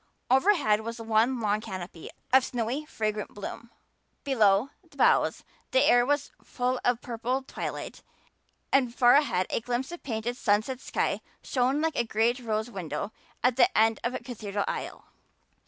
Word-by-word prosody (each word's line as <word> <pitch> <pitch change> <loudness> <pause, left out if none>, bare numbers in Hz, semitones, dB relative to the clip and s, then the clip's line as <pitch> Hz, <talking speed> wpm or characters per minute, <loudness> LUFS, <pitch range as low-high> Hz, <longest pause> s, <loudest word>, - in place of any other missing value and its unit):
Overhead 265 - +4
was 230 +1 -6
one 225 +3 +2
long 210 -1 0
canopy 180 -5 -7 0.2
of 265 0 +7
snowy 245 +5 -2
fragrant 215 -5 -3
bloom. 205 +3 -7 0.5
Below 225 -3 +3
the - - -22
boughs - - +3 0.3
the - - +4
air 245 0 +5
was 290 0 0
full 250 0 -1
of 245 - +3
a - - -22
purple 245 +2 -3
twilight - - -6 0.7
and 250 -3 +3
far 245 -1 +6
ahead 275 -11 +3
a - - +1
glimpse 245 +5 -2
of 345 - -8
painted 240 -1 -3
sunset 215 +4 +1
sky - - -1 0.2
shone 260 +3 +1
like 320 -1 0
a - - +2
great 230 +2 +1
rose 220 -1 -2
window 180 0 -4 0.3
at 250 -1 +3
the 365 +8 +4
end 225 0 +4
of 240 +2 -1
a - - -2
cathedral 210 -4 -4
aisle. - - -5
240 Hz, 160 wpm, -28 LUFS, 215-260 Hz, 0.7 s, of